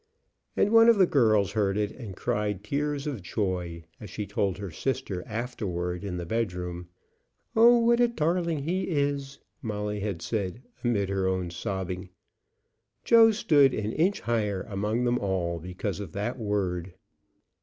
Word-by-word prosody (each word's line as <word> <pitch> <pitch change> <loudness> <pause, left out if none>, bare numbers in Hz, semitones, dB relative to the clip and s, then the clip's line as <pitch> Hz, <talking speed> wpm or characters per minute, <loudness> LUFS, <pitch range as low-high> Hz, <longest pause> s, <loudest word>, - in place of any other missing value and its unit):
And 205 - +3
one 225 0 +7
of 230 - +6
the 190 - +6
girls 110 - +3
heard 100 -2 +1
it, 105 0 0
and 110 -7 -9
cried 105 0 -2
tears 145 +5 -2
of 140 -8 -3
joy 90 -3 -3 0.2
as 105 - -9
she 105 +2 -4
told 100 -1 -1
her 100 -3 -6
sister 100 - -3
afterward 100 -6 -3
in 95 -3 -4
the 85 - -4
bedroom. 90 -4 -3 0.7
"Oh, 235 +2 +7
what 235 0 +3
a 240 - +5
darling 170 -6 0
he 180 +5 -1
is!" 140 -3 -1 0.2
Molly 105 -2 -3
had 100 -4 -3
said, 110 +2 -3 0.2
amid 105 -5 +1
her 95 -1 0
own 95 -2 -1
sobbing. 95 0 -4 0.9
Joe 230 -1 +7
stood 150 - +4
an 110 0 -2
inch 180 - +1
higher 105 -5 -1
among 105 +3 -1
them 120 0 +1
all 90 -4 -1
because 90 +4 -4
of 100 -6 -7
that 120 +6 -3
word. 95 -4 -2
105 Hz, 155 wpm, -27 LUFS, 95-140 Hz, 0.9 s, one